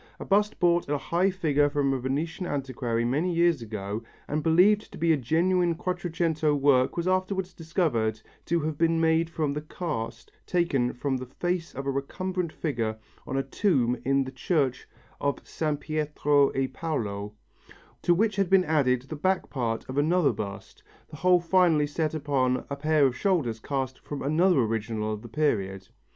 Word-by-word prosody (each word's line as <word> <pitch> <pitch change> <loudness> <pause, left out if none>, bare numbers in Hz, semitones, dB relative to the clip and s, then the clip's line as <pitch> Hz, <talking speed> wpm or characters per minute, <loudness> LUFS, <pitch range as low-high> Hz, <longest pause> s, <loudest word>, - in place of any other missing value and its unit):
A - - -6
bust 210 +2 +2
bought 175 -3 +2
at 145 - +1
a - - +1
high 175 +6 +1
figure 150 -6 +2
from 140 -1 +1
a 135 - -1
Venetian 155 +8 -2
antiquary 125 -5 -2
many 150 +9 0
years 170 -4 +2
ago 105 -1 -4 0.3
and 150 +1 -1
believed 185 +7 +4
to - - -10
be 165 -1 +3
genuine 170 +6 +1
Quattrocento 170 -3 0
work 135 -1 +3
was 170 +1 -1
afterwards 185 0 0
discovered 150 - -1 0.3
to 170 -1 +1
have 155 -1 -3
been 165 0 +3
made 165 0 +2
from 155 -3 -1
the 150 - -3
cast 155 -7 -5 0.2
taken 140 -9 +1
from 130 +1 -2
the 130 0 -7
face 175 +5 -3
of 135 +1 -5
a 140 - 0
recumbent 180 +5 -3
figure 115 -10 -2 0.3
on 135 - -2
a 135 - +1
tomb 135 - +1
in 135 +1 +2
the 130 - -7
church 135 -1 -1 0.3
of 140 -1 -2
San 155 -2 -1
Pietro 150 -2 +1
e 135 0 +1
Paolo, 105 -9 -4 0.7
to 175 - +3
which 210 +2 +1
had 195 -3 +1
been 190 -1 +5
added 130 -5 +2
the 135 +4 -7
back 185 +5 0
part 115 -4 -2
of 130 +2 -2
another 160 +1 +3
bust, 100 -2 -7 0.3
the 150 - -9
whole 180 +2 +4
finally 170 -3 +3
set 155 +1 -2
upon 135 -4 0
a - - -1
pair 155 0 +3
of 130 -2 +1
shoulders 150 - 0
cast 130 +1 -3
from 145 - -6
another 160 +2 +3
original 110 -1 -2
of 105 - -6
the 120 - -10
period. 95 -9 -1
150 Hz, 175 wpm, -27 LUFS, 130-170 Hz, 0.7 s, been